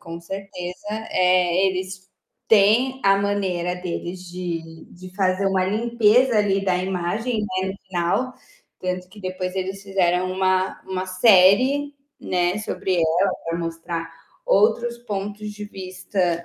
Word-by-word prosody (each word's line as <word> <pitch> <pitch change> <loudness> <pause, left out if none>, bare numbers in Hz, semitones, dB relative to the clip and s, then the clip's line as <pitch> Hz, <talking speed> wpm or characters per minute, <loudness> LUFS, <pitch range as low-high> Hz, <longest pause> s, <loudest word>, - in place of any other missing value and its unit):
com 165 0 -8
certeza. 180 0 -7 0.2
Eh, 180 0 +3
eles 185 0 -4 0.4
têm 225 +5 +4
a 195 0 +6
maneira 190 -3 -1
deles 180 0 -5
de 165 -3 -6
de 185 +1 -12
fazer 190 0 +1
uma 190 -1 +2
limpeza, 235 +2 +3
ali, 195 -1 +1
da 185 -2 +2
imagem, 190 +6 -1
né, 190 -2 -2
no 190 - -4
final, 180 +8 0 0.5
tanto 180 0 -3
que 205 +3 -14
depois 185 -1 -4
eles 190 +1 -3
fizeram 185 -2 +1
uma 185 0 0
uma 185 -1 -3
série, 220 +9 +4 0.3
né, 180 +1 0
sobre 190 -3 -2
ela, 170 +4 +2
para 165 0 -2
mostrar 165 0 -4 0.4
outros 240 - +2
pontos 210 -2 -5
de 210 0 -8
vista, 185 -3 -2
185 Hz, 130 wpm, -23 LUFS, 180-205 Hz, 0.5 s, a